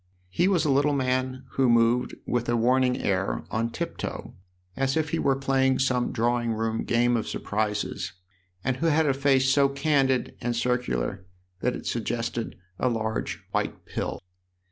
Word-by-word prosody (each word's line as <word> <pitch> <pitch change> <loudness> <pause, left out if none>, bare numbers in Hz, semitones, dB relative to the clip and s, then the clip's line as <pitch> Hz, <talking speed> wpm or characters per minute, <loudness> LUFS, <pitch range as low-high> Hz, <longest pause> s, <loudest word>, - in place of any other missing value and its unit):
He 175 - +2
was 180 -5 +2
a 145 - +3
little 145 +2 +3
man 130 0 -1
who 130 -2 +2
moved, 115 +1 +3
with 120 -1 -1
a 120 - +2
warning 125 +2 +3
air, 95 -1 0
on 115 +1 0
tiptoe, - - -5 0.4
as 135 +2 0
if 155 -1 0
he 165 - 0
were 135 - +2
playing 135 -1 +2
some 125 -2 +1
drawing 120 0 0
room 110 0 -1
game 120 +1 +2
of 115 - -1
surprises, 105 -2 -2 0.5
and 130 0 0
who 165 - 0
had 160 0 +3
a 140 - +3
face 135 -1 +3
so 140 0 +4
candid 135 -2 +1
and 120 0 -1
circular 115 - -1 0.3
that 125 +4 0
it - - -8
sug 115 -2 -2
gested 115 0 -2 0.2
a 125 - +2
large 110 -2 -2
white - - -2
pill. - - -4
125 Hz, 165 wpm, -26 LUFS, 115-135 Hz, 0.5 s, so